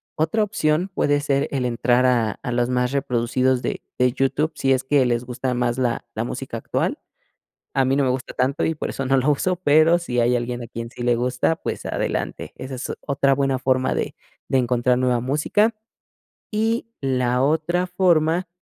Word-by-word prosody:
Otra 160 +8 +1
opción, 185 -3 0
puede 145 -3 +1
ser 140 -1 +1
el 135 -3 -1
entrar 120 +1 +2
a 120 -4 +2
a 130 - -3
los 120 0 +1
más 125 0 +1
reproducidos 130 -1 +1
de - - -3 0.2
de 125 0 +3
YouTube, 135 +4 0
si 135 0 +2
es 130 0 0
que 135 0 +3
les 120 -1 0
gusta 125 +1 -3
más 120 0 0
la 120 -3 -1
la 110 - -2
música - - -5
actual. - - -2 0.7
A 135 - +3
mí 130 +1 +2
no 140 - +3
me - - +1
gusta 125 0 -3
tanto 135 +3 0
y 160 - +1
por - - -4
eso 135 - -4
no 135 +1 +3
lo 130 +3 +2
uso, 180 +6 0
pero, 160 0 +4
si 125 -8 -2
hay 120 +1 +3
alguien 120 0 -4
a - - -8
quien 115 0 -6
sí 120 - -10
le 120 0 +3
gusta, 125 +6 +1
pues - - -5
adelante, - - -3
esa 130 0 -6
es 125 - -4
otra 140 -1 +2
buena 135 -1 +1
forma 130 0 +1
de - - -3 0.3
de 135 - +3
encontrar 125 0 +2
nueva 125 -1 +1
música. 150 - +1 0.8
Y 225 +2 0
la 125 -2 +1
otra 160 +5 +1
forma 175 -1 +2
130 Hz, 195 wpm, -22 LUFS, 125-150 Hz, 0.8 s, pero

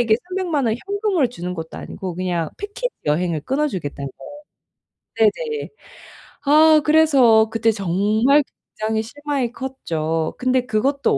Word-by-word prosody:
이게 225 -2 +4
3,000,000 355 -8 -1
원 220 - +1
현금을 400 - +1
주는 180 -6 -5
것도 160 -2 -7
아니고 190 -3 -6
그냥 175 -3 -2
패키지 410 +5 -4 0.2
여행을 165 +1 0
끊어주겠다는 185 - -2 0.9
거예요. 220 -2 +1
네네. 450 -2 -4 0.8
아 310 +1 +6
그래서 270 -8 +5
그때 225 0 +2
정말 215 - +2 0.4
굉장히 220 0 0
실망이 280 0 -3
컸죠. 165 - -3
근데 255 0 +1
그것도 265 +5 +1
240 Hz, 285 characters per minute, -21 LUFS, 185-295 Hz, 0.9 s, 아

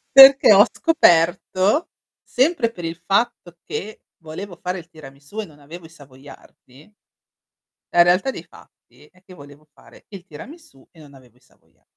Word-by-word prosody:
Perché 270 -5 +8
ho 205 +3 +6
scoperto, 185 - +1 0.3
sempre 260 -3 -1
per 175 -6 -12
il 165 0 -5
fatto 195 -3 -2
che 215 +2 -8
volevo 175 +3 -10
fare 180 +2 -6
il 170 0 -16
tiramisù 145 +5 -11
e - - -9
non 150 -5 -20
avevo 165 +4 -13
i 160 - -15
savoiardi, 140 +1 -19 1.0
la 175 - +4
realtà 180 +8 +1
dei 175 -10 -10
fatti 125 -4 -22
è 185 0 -27
che 185 -1 -17
volevo 145 -1 -17
fare - - -21
il 195 -4 -12
tiramisù 195 - -15
e 165 - -21
non 145 -2 -17
avevo 125 -3 -21
i - - -30
savoia - - -34
175 Hz, 160 wpm, -19 LUFS, 145-205 Hz, 1.0 s, Perché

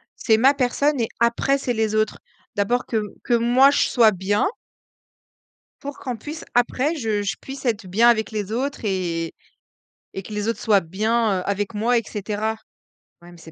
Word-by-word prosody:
C'est 220 -2 +2
ma 265 +5 +5
personne 280 +1 +1
et 225 - -1
après 235 +4 +2
c'est 250 -3 -2
les 220 -1 0
autres. 215 0 0 0.4
D'abord 235 +4 0
que 220 -2 -1 0.2
que 240 - 0
moi 245 +4 +5
je - - +2
sois 230 -4 +5
bien. 195 +2 0 1.3
Pour 285 0 -7
qu'on 250 -3 -4
puisse 300 +8 -8
après 255 +6 +1
je 220 -6 -1
je 195 -1 -2
puisse 270 +1 -9
être 220 -5 -1
bien 225 +6 +4
avec 220 -2 0
les 210 -2 -4
autres 265 +1 -3
et 170 -4 -2 0.8
et 195 - -5
que 215 - -9
les 210 +1 -2
autres 230 - -1
soient 210 -3 +4
bien, 215 +3 0
heu, 180 - -5
avec 200 +2 -2
moi 235 +3 +2
et 230 - 0
cetera. 215 +2 -3 0.6
Ouais 175 0 -14
mais 175 - -15
c'est 165 0 -13
220 Hz, 185 wpm, -22 LUFS, 205-245 Hz, 1.3 s, ma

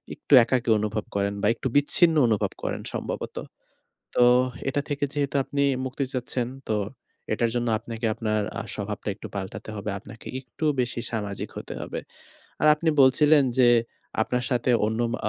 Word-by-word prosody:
একটু - - -2
একাকী 120 0 0
অনুভব 105 0 -2
করেন 100 0 0
বা 105 - +2
একটু - - -3
বিচ্ছিন্ন 160 +4 +5
অনুভব 110 -3 +1
করেন - - -2
সম্ভবত। - - -4 0.8
তো 120 - +5 0.4
এটা 145 +2 0
থেকে 145 -1 -1
যেহেতু 140 -2 -1
আপনি 140 +1 -1 0.2
মুক্তি 130 +2 -2
চাচ্ছেন। 125 -1 -2 0.2
তো 110 - +1 0.6
এটার 115 -1 +1
জন্য 120 -1 0
আপনাকে 115 +1 -5
আপনার 110 -1 -1 0.2
আ - - -2
স্বভাবটা 105 +1 -5
একটু 105 - -9
পাল্টাতে 100 +3 -5
হবে। 105 +1 -4
আপনাকে 110 +4 -13
একটু 130 +4 -7 0.2
বেশি 120 -1 -1
সামাজিক 105 -3 -3
হতে - - -6
হবে। - - -4 0.6
আর - - +3
আপনি 160 +2 -2
বলছিলেন 145 +2 +5
যে 125 -2 +6 0.5
আপনার 125 +2 -1
সাথে 125 0 +1 0.2
অন্য 110 +2 -1
ম - - -2
120 Hz, 160 wpm, -25 LUFS, 110-135 Hz, 0.8 s, যে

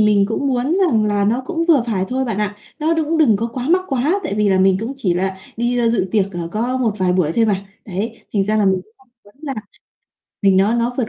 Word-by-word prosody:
mình 210 -2 +4
cũng 280 +5 -1
muốn 255 +5 0
rằng 225 -9 +2
là 205 -1 +1
nó 235 +5 +1
cũng 330 +1 -1
vừa 295 -7 +5
phải 200 -5 0
thôi 260 +1 -1
bạn 225 -5 -3
ạ. 205 -1 -2 0.2
Nó 320 +1 +1
đũng 320 0 0
đừng 250 -10 +5
có 225 +3 -2
quá 255 +2 -4
mắc 365 +3 +3
quá, 290 +9 +1
tại 305 - -2
vì 210 -1 +2
là 190 -1 +3
mình 190 0 +4
cũng 230 +4 -3
chỉ 190 -10 0
là 190 +1 -1 0.2
đi, 240 +1 0
ơ, 230 -1 +2
dự 205 -5 0
tiệc, 200 -3 +3
ờ, 170 -1 -4
có 240 +4 -1
một 240 -4 +1
vài 185 -1 +2
buổi 175 -4 +1
thôi 230 - +2
mà. 195 -2 -1 0.2
Đấy, 215 +4 -5
thành 200 -2 +1
ra 215 +2 0
là 210 - +2
mình 190 -1 +2
cũng 215 - -30
không 265 - -26 0.2
muốn 205 - -20
là 280 -3 -4 0.9
mình 195 -1 +4
nó 200 +4 +3
nó 240 +1 0
vượt 235 -4 0
220 Hz, 270 wpm, -19 LUFS, 195-255 Hz, 0.9 s, vừa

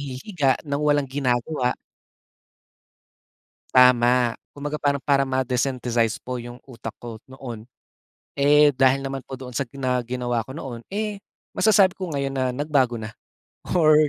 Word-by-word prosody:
hihiga 140 - -1
ng 140 0 -2
walang 145 -2 +2
ginagawa. 130 0 0 2.0
Tama. 125 -1 +5 0.2
Kumbaga 145 +1 -5
parang, 140 -1 +2
para 140 0 +3
ma-desynthesis 125 -3 0
po 125 -1 -5
yung 120 +1 -9
utak 115 -4 -7
ko 115 -2 -9
noon. 120 -5 -8 0.8
Eh, 145 +1 +6
dahil 135 +1 +3
naman 135 0 -3
po 135 - -6
doon 130 -1 -9
sa 135 +1 -2
na 130 -2 0
ginawa 120 -1 -1
ko 130 - -8
noon, 125 -7 -6
eh, 210 0 -3 0.3
masasabi 200 -4 +4
ko 185 - -3
ngayon 140 -4 -2
na 130 -2 -1
nagbago 140 -4 +1
na, 110 0 -6 0.6
or 155 -3 +6
130 Hz, 135 wpm, -23 LUFS, 125-145 Hz, 2.0 s, Eh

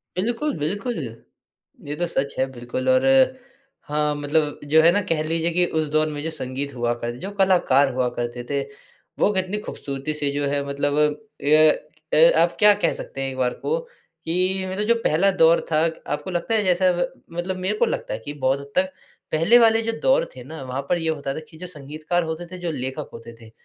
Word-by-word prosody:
बिल्कुल, 240 +9 -1
बिल्कुल। 205 - -2 0.9
ये 145 - -3
तो 175 - -1
सच 140 -4 -1
है 130 - +3
बिल्कुल 130 - -4
और 260 +1 +4 0.8
हाँ, 150 0 0
मतलब 145 +1 -1
जो 160 0 +7
है 170 +1 +6
ना 205 +2 +2
कह 160 -2 +1
लीजिए 165 +1 -1
कि 180 0 +3
उस 155 - -1
दौर 155 0 +2
में 145 -1 -5
जो 165 - -2
संगीत 140 -2 -5
हुआ 120 0 0
करते 120 0 -5
थे, - - -12
जो 195 - -6
कलाकार 145 -9 +3
हुआ 125 -1 +1
करते 120 0 -3
थे 140 -1 0 0.6
वो - - +4
कितनी 190 +2 0
खूबसूरती 140 -6 -5
से 145 -2 -1
जो 145 0 -1
है 140 0 -1
मतलब 145 +1 -1 0.5
ये 150 +2 +5 0.6
ए - - +7
आप - - +3
क्या 210 -1 +8
कह - - +3
सकते 135 - -7
हैं 135 - -1
एक 130 - -7
बार 125 -1 +1
को, 485 +2 -2
कि 185 - -3
मतलब 205 +2 -1
जो 235 - +4
पहला 195 +6 +3
दौर 165 -2 +4
था 155 - +4 0.3
आपको 185 +5 -4
लगता 175 +6 -2
है 210 - +2
जैसा 185 0 +3
ब 175 +8 0 0.3
मतलब 185 +2 -2
मेरे 190 +3 -1
को - - +3
लगता - - -3
है - - -4
कि 145 - -5
बहुत 135 +1 +2
हद 140 0 -11
तक 185 +1 +2 0.4
पहले 170 +10 +5
वाले 225 -1 +5
जो 230 0 -1
दौर - - +3
थे 125 - -9
ना 155 +2 -9
वहाँ 130 +2 -4
पर 175 - +3
ये 165 -1 -1
होता 140 -3 -2
था - - -4
कि 160 - -15
जो 180 - -7
संगीतकार 155 +2 -3
होते 160 +2 -4
थे 185 - -7
जो 175 -2 -3
लेखक 135 +1 -5
होते 115 0 -10
थे, 110 0 -14
160 Hz, 220 wpm, -23 LUFS, 140-185 Hz, 0.9 s, क्या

